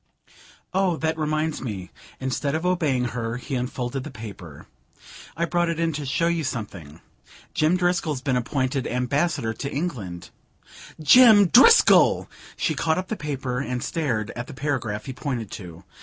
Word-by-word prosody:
"Oh, 185 -3 +1
that 160 0 -1
reminds 155 0 -1
me 100 -8 -6
" - - -22
instead 135 +2 -2
of 160 +2 -2
obeying 155 -9 +1
her 115 0 -3
he 130 +3 -7
unfolded 125 +1 -3
the 155 - -7
paper. 100 - -10 0.7
"I 170 - +1
brought 175 0 0
it 165 -1 -2
in 165 -1 0
to 145 -1 -4
show 165 +5 0
you 170 -1 0
something. 100 - -6 0.5
Jim 155 +4 +2
Driscoll's 175 -5 0
been 130 -3 0
appointed 130 +1 -1
Ambassador 130 0 0
to 140 +4 -5
England." 115 - -5 0.7
"Jim 205 - +7
Driscoll 455 - +6 0.2
!" - - -18
She 160 - 0
caught 160 +2 0
up 185 0 -4
the 220 - -1
paper 135 -6 -3
and 125 -3 -3
stared 120 -10 -2
at 120 0 -5
the - - -9
paragraph 130 -7 -3
he 130 - -5
pointed 125 -7 -4
to. 85 -4 -9
140 Hz, 165 wpm, -24 LUFS, 120-165 Hz, 0.7 s, Jim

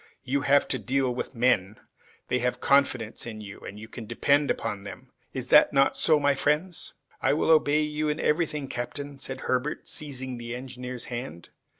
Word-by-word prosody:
"You 140 +2 0
have 140 0 +4
to - - 0
deal 130 -1 0
with 125 - -5
men. 115 -4 +2 0.5
They 125 - +1
have 125 +1 -1
confidence 130 -6 +1
in 110 -2 -6
you, 100 -2 -9
and 105 - -9
you 110 - -9
can 115 -1 -9
depend 140 +5 +2
upon 100 -1 -2
them. 125 +6 -10 0.2
Is 130 -1 -4
it 150 - +8
not 135 0 +4
so, 155 -2 +4
my 145 0 +3
friends?" 150 +6 -1 0.3
"I - - +3
will 160 +2 +2
obey 155 -1 +4
you 150 0 -1
in 150 - -1
everything, 150 -3 0
captain," 140 +3 -5
said 130 -1 -3
Herbert, 130 +4 -1
seizing 130 -4 -5
the 120 0 -5
engineer's 125 -1 -6
hand. 120 -8 -6
130 Hz, 185 wpm, -27 LUFS, 120-145 Hz, 0.5 s, it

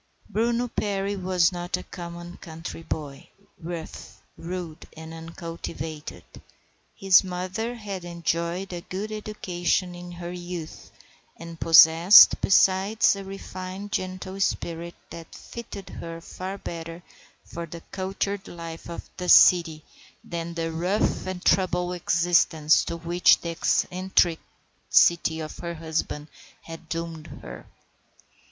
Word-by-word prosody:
Bruno 235 +2 +1
Perry 200 -3 -2
was 185 -2 +2
not 175 0 -3
a - - -8
common 175 0 -8
country 165 0 -8
boy, 150 -3 -6 0.3
rough, 170 -1 -8 0.2
rude, 170 -2 -7
and 160 0 -9
uncultivated. 165 -2 -7 0.7
His 195 -1 +5
mother 185 +6 -4
had 200 -5 -6
enjoyed 170 +2 -2
a 175 - -5
good 200 +5 -5
education 185 -4 -2
in 175 0 -9
her 175 0 -6
youth, 175 -2 -7 0.5
and 165 0 -10
possessed 165 +3 +8
besides 195 +3 +4
a 200 - -7
refined, 195 0 -7
gentle 185 -1 -4
spirit 170 -2 -2 0.2
that 165 -1 -10
fitted 210 -4 -9
her 165 0 -7
far 185 +3 -7
better 165 -1 -7 0.4
for 170 0 -7
the 170 +1 -9
cultured 195 +1 -3
life 165 -1 -8
of 170 - -7
the 180 -1 -3
city 165 -4 +6 0.4
than 170 0 -5
the 165 -1 -2
rough 180 +5 0
and 185 -1 -5
tumble 180 -1 +2
existence 170 -3 +3
to 170 - -4
which 170 +2 +4
the 170 - -4
eccentricity 170 -1 +1
of 155 -1 -6
her 170 -1 -5
husband 160 -2 -3 0.4
had 165 -1 -10
doomed 165 -2 -5 0.2
her. - - -9
175 Hz, 120 wpm, -25 LUFS, 165-185 Hz, 0.7 s, possessed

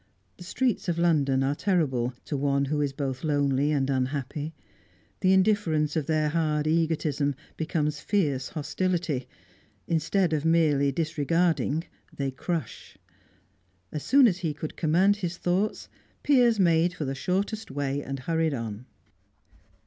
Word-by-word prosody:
The - - -10
streets 235 +2 -1
of 170 - 0
London 145 -6 +2
are 135 +1 +1
terrible 140 - 0
to - - -3
one 140 0 +1
who 150 +2 -1
is 145 -1 0
both 135 -2 -4
lonely 145 -1 +1
and 140 -3 +1
unhappy; 140 +3 -2 0.6
the 185 -2 +3
indifference 185 -6 +2
of 155 -4 -1
their 155 -1 +1
hard 155 -1 0
egotism 155 -3 0 0.2
becomes 150 -2 -1
fierce 145 -11 0
hostility; 155 -3 -2 0.6
instead 165 +2 +1
of 150 -2 0
merely 155 -4 +3
disregarding, 160 +1 0 0.3
they 140 -1 -3
crush. 155 - -5 0.9
As 150 - -4
soon 275 - +5
as 185 -4 0
he 160 -5 -2
could 155 +1 -6
command 185 +6 +3
his 180 -3 -4
thoughts, 185 +5 -1 0.4
Piers 245 -6 +4
made 170 -1 +3
for 155 - -3
the 135 - -2
shortest 195 +9 -2
way, 140 0 -2
and 135 -1 -5
hurried 160 0 0
on. 115 0 -6
155 Hz, 140 wpm, -27 LUFS, 140-175 Hz, 0.9 s, soon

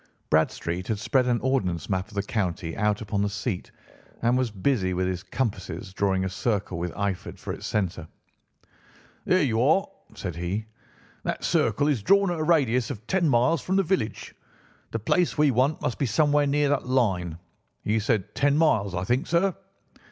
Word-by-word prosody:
Bradstreet 85 +3 0
had 110 - -1
spread 130 +4 +1
an 120 -1 +2
ordnance 100 -11 0
map 95 -1 -1
of - - -15
the 100 - 0
county 90 -6 -2
out 105 0 +1
upon 105 -2 -1
the 100 - +1
seat 100 -1 -3 0.5
and 120 +1 +3
was 130 -2 +1
busy 100 -2 0
with 90 +1 0
his 90 -1 -2
compasses 95 -6 -4
drawing 95 -1 +1
a - - 0
circle 95 -3 -2
with 85 0 -2
Eyford 100 -2 -3
for - - -5
its - - -6
centre. 90 -6 -2 1.2
"There 185 -2 +3
you 115 -4 +1
are," 160 +10 +4 0.3
said 90 -5 -5
he. 90 +5 -2 0.6
"That - - -3
circle 145 - +2
is 140 -7 +1
drawn 195 - +4
at 170 - -2
a - - 0
radius 130 -8 +2
of 110 0 -6
ten 175 +2 +1
miles 125 +5 +3
from 190 - -1
the 195 - +4
village. 140 - -2 0.6
The - - -2
place 165 - +1
we 150 -1 +4
want 130 +5 +1
must 120 - -2
be 140 - +1
somewhere 145 +4 +3
near 145 0 +2
that 140 -3 0
line. 95 -10 +1 0.5
You 110 +1 +1
said 110 -3 -1
ten 145 0 +2
miles, 110 - +2
I 90 - -1
think, 125 - 0
sir." 175 +2 +2
110 Hz, 185 wpm, -26 LUFS, 95-140 Hz, 1.2 s, are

